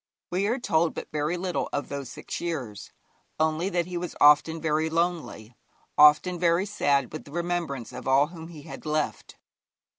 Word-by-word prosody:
We 190 +3 +1
are 235 +4 +1
told 170 -9 +1
but - - -7
very 150 +3 -1
little 180 0 -2
of 145 - -2
those 140 -3 -5
six 135 - -7
years, 125 -12 -5 0.5
only 160 +4 +1
that 175 -3 0
he 180 0 -5
was 175 0 -5
often 150 +2 +5
very 155 0 0
lonely, 165 -9 -2 0.4
often 150 +4 +6
very 170 +2 +2
sad 140 - 0
with 155 - -6
the 140 - -13
remembrance 170 -7 -3
of 125 - -7
all 135 +2 +5
whom 165 -2 -9
he 160 -4 -11
had - - -9
left. 155 0 -2
160 Hz, 175 wpm, -26 LUFS, 145-175 Hz, 0.5 s, often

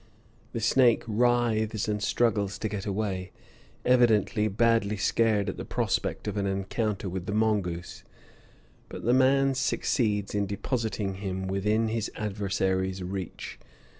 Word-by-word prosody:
The - - -2
snake 120 +1 +4
writhes 115 -2 +1
and 105 -1 -1
struggles 105 -3 +1
to 110 - -2
get 105 -1 -4
away, 95 -2 -2 0.5
evidently 110 -4 +3
badly 110 0 +2
scared 105 0 +2
at - - -3
the - - -5
prospect - - -2
of - - -3
an 100 -1 0
encounter 100 +1 -2
with 90 +1 -5
the 105 - -2
mongoose; 100 -6 -1 0.9
but - - -8
the 120 - +4
man 135 +1 +4
succeeds 105 -6 0
in 100 -1 0
depositing 105 -2 -2
him 95 -1 -3
within 105 +4 +1
his 115 -1 -2
adversary's 95 -2 -1
reach. 95 -1 -6
105 Hz, 135 wpm, -27 LUFS, 95-115 Hz, 0.9 s, snake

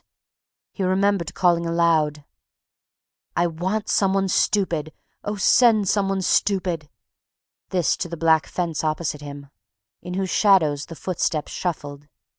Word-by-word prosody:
He - - -8
remembered 185 -2 0
calling 170 -2 +2
aloud: 160 -3 +1 1.1
"I 175 - +3
want 185 +6 -2
some 195 -1 +2
one 195 -1 +1
stupid. 170 -6 0 0.3
Oh, 205 - -3
send 215 +1 +4
some 200 -2 +1
one 195 -1 -1
stupid!" 180 -6 0 0.8
This 180 -3 +1
to 175 - -4
the 170 - -6
black 160 -1 +3
fence 170 -4 -3
opposite 155 -1 -2
him, 140 -1 -10 0.5
in 180 0 -6
whose 190 -1 -2
shadows 160 -9 +3
the 165 - -9
footsteps 165 -3 -2
shuffled 145 -5 -5
175 Hz, 130 wpm, -23 LUFS, 155-195 Hz, 1.1 s, send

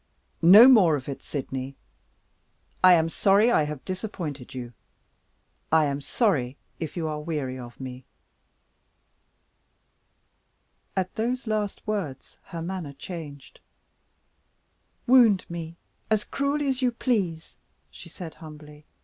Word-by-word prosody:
"No 200 +9 +9
more 200 - +6
of 135 -3 -6
it, 140 - -6
Sydney! 135 -1 -5 1.1
I 185 0 +9
am 165 -2 +3
sorry 200 +7 +3
I 155 - +3
have 150 -2 -7
disappointed 175 - -6
you; 120 -2 -7 1.0
I 160 -1 +5
am 140 0 -2
sorry 140 - 0 0.2
if 160 +1 -5
you 165 -2 -2
are 155 -1 -3
weary 145 -5 -4
of 120 -1 -11
me." 130 -1 -8 2.9
At 185 -1 -1
those 245 +3 -2
last 215 -2 -3
words 190 -11 -4
her 170 -3 -7
manner 175 -5 -5
changed. 145 -3 -9 1.5
"Wound 235 -6 +5
me 170 -1 -7 0.3
as 215 -1 +2
cruelly 280 +1 -1
as 265 -1 0
you 250 -1 +2
please," 200 -10 -2 0.4
she 170 - -12
said, 170 -1 -9
humbly. 150 -1 -13
165 Hz, 120 wpm, -26 LUFS, 145-210 Hz, 2.9 s, No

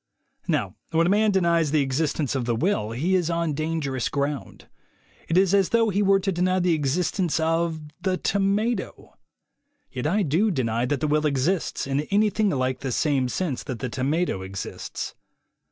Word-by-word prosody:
Now - - -1
when 165 +1 +2
a 180 - +2
man 215 +1 +3
denies 170 -5 +2
the 150 -1 +2
existence 140 +1 -1
of 130 -3 -1
the 120 -1 0
will 130 - 0
he 145 +12 -1
is 180 -3 +2
on 170 -2 0
dangerous 150 -4 -2
ground. 140 0 -3 0.6
It 165 - +1
is 190 0 +4
as 195 -2 +3
if 230 -3 +3
he 200 - +2
were 195 -1 +4
to 195 +1 0
deny 185 +1 +1
the 175 -1 +2
existence 165 +4 0
of 165 0 0 0.2
the 185 0 0
tomato. 200 +5 -1 0.8
Yet 130 +2 -3
I 200 +6 +2
do 175 +8 +2
deny 120 - 0
that 140 -1 -1
the 155 - +1
will 150 +1 +2
exists, 150 +6 0
in 135 0 -1
anything 210 +1 +2
like 130 -4 -1
the 135 - -3
same 135 -1 +1
sense 155 -3 -2
that 130 -4 -4
the 130 +2 -4
tomato 140 - -1
exists. 95 +1 -6
160 Hz, 175 wpm, -25 LUFS, 135-185 Hz, 0.8 s, is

